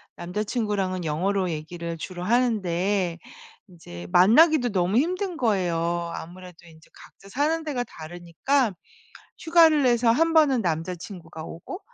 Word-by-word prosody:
남자친구랑은 195 -1 -3
영어로 185 +4 -1
얘기를 165 +2 -6
주로 175 +2 -7
하는데 195 -5 0 0.5
이제 90 - -11
만나기도 245 - +5
너무 190 0 0
힘든 360 +4 -1
거예요. 170 -6 -1
아무래도 180 +1 -9
인제 160 -1 -18
각자 195 - -17
사는 305 +8 0
데가 280 -6 -2
다르니까 175 - -2 0.7
휴가를 320 -3 +4
내서 240 -2 +3
1 325 +6 +2
번은 285 -7 +4
남자친구가 165 0 -5
오고 170 - -8
190 Hz, 300 characters per minute, -24 LUFS, 170-250 Hz, 0.7 s, 만나기도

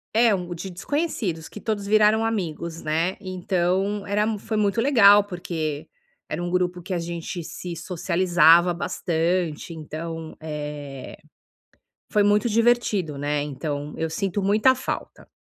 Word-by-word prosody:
é, 235 +1 +5 0.3
de 190 +3 -6
desconhecidos, 190 - -3
que 210 - -9
todos 205 -3 -3
viraram 215 +1 +4
amigos, 170 -6 -3
né. 165 +4 0
Então, 185 +1 -1
era 205 +1 +1
foi 220 +2 -3
muito 210 +1 +1
legal 205 -7 +7
porque 165 -6 -4 0.4
era 175 - -2
um 175 - -2
grupo 180 -1 0
que 185 +2 -5
a 175 - 0
gente 170 +1 -5
se 175 +2 -7
socializava 175 -1 +4
bastante, 170 -1 -1
então, 160 +1 -6
eh, 150 -3 -6 0.9
foi 210 -1 +4
muito 210 +3 +3
divertido, 220 -9 +2
né. 145 +1 -1
Então 145 0 -4
eu 160 0 -1
sinto 195 +3 -2
muita 215 +6 +4
falta. 260 - -5
180 Hz, 130 wpm, -24 LUFS, 160-205 Hz, 0.9 s, legal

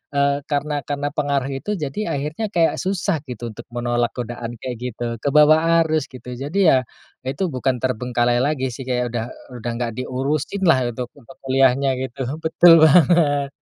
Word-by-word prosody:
eee, 140 0 +2
karena 145 0 -1
karena 145 0 -2
pengaruh 140 -2 -1
itu 140 +10 -3
jadi 150 +1 -4 0.2
akhirnya 150 +10 -3
kayak 165 -1 +2
susah 190 -2 -1
gitu 120 -2 -6
untuk 120 +2 -11
menolak 120 0 -1
godaan 120 -1 -5
kayak 125 -1 -4
gitu, 120 -1 -5
ke 140 - -4
bawa 150 +1 +7 0.3
arus 155 -2 -1
gitu. 125 -1 -10
Jadi 160 +6 +2
ya, 130 -2 +2 0.4
itu 135 +7 -2
bukan 130 0 0
terbengkalai 120 -1 0
lagi 130 -1 0
sih, 130 +2 -8
kayak 125 -1 -1
udah 115 -2 -2 0.3
udah 120 +1 -3
nggak 120 0 -2
diurusin 140 +9 -2
lah, 135 - +5
untuk 120 +1 -5
untuk 130 +3 -16
kuliahnya 135 0 +3
gitu. 130 +1 -4 0.2
Betul 165 +1 +6
banget. 145 -3 +4
135 Hz, 165 wpm, -21 LUFS, 125-150 Hz, 0.4 s, bawa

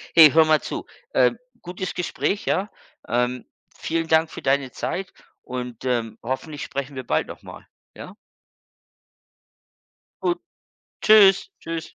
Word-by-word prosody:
Hey, 155 -4 +10
hör 160 0 +6
mal 155 -1 +3
zu, - - -5 0.3
ähm, 125 - +3 0.2
Gutes 180 +1 -5
Gespräch, 185 +3 -2
ja, 200 +3 0 0.4
ähm, 125 +1 -1 0.3
Vielen 165 0 -1
Dank 160 0 +3
für - - -8
deine 135 -1 +1
Zeit 190 0 -4 0.3
und, 125 -1 -6
ähm, 115 -3 -1
hoffentlich 145 +4 -4
sprechen 140 0 -5
wir 130 - -5
bald - - 0
noch - - -10
mal, - - -11 0.3
ja? 185 - -10 2.1
Gut. 350 0 0 0.6
Tschüs, 200 -3 +6
Tschüs. 165 -1 -4
155 Hz, 130 wpm, -23 LUFS, 125-180 Hz, 2.1 s, Hey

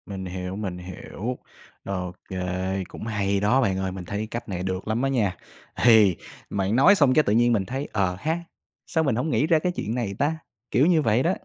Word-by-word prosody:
Mình 95 -2 -6
hiểu, 90 +1 -5
mình 95 -4 -4
hiểu, 95 +7 -6 0.5
ô 90 -2 -3 0.2
kê, 95 +1 -2
cũng - - -9
hay 100 -2 0
đó 110 +7 +3
bạn 95 -6 +1
ơi, 95 0 -2
mình 90 -1 -7
thấy 105 +4 -3
cách 115 -1 -5
này 90 -2 -3
được 95 +1 -3
lắm 110 +2 0
á 135 - +1
nha. 105 -9 0 0.5
Thì 110 -6 +6 0.3
bạn 100 +2 0
nói 140 +11 +7
xong 145 -8 +4
cái 155 - +5
tự 105 - +1
nhiên 120 +1 +4
mình 100 -4 +1
thấy 135 +5 -4
"Ờ 95 -3 +1
ha, 160 +7 -1 0.5
sao 160 - +1
mình 135 -7 +1
hổng 125 +7 -1
nghĩ 150 0 +2
ra 160 -2 +4
cái 180 +3 0
chuyện 115 - -3
này 115 -6 -2
ta?", 155 +3 +1 0.3
kiểu 125 +6 +4
như 165 -2 +4
vậy 115 -1 +2
đó. 175 - +2
105 Hz, 225 wpm, -25 LUFS, 95-130 Hz, 0.5 s, nói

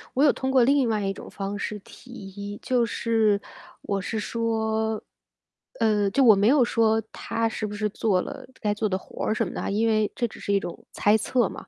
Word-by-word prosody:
我 270 - +3
有 300 - +6
通 265 - -3
过 265 -2 +5
另 270 -1 +3
外 210 -2 0
一 195 - -1
种 - - -10
方 200 +1 -4
式 210 - -3
提 250 - -15
议， 205 -2 -7
就 250 -2 +1
是 220 -3 +1 0.4
我 200 -1 -1
是 220 +4 -3
说 220 -1 -1 0.8
呃， 210 -3 +2
就 270 +8 +3
我 220 -5 +8
没 200 +2 +3
有 265 0 +5
说 225 -1 +2
她 230 0 -2
是 220 -1 -3
不 210 - -6
是 210 +1 0
做 205 -2 +1
了 - - -8
该 210 -2 0
做 215 0 -1
的 185 - 0
活 - - -7
儿 215 - +1
什 - - 0
么 - - -7
的 - - -4
啊， - - -2
因 215 +3 +1
为 215 -2 +2
这 240 - 0
只 - - -13
是 - - -3
一 200 - +4
种 175 - -7
猜 205 +1 +3
测 230 +1 +1
嘛。 - - -10
220 Hz, 245 characters per minute, -25 LUFS, 205-230 Hz, 0.8 s, 我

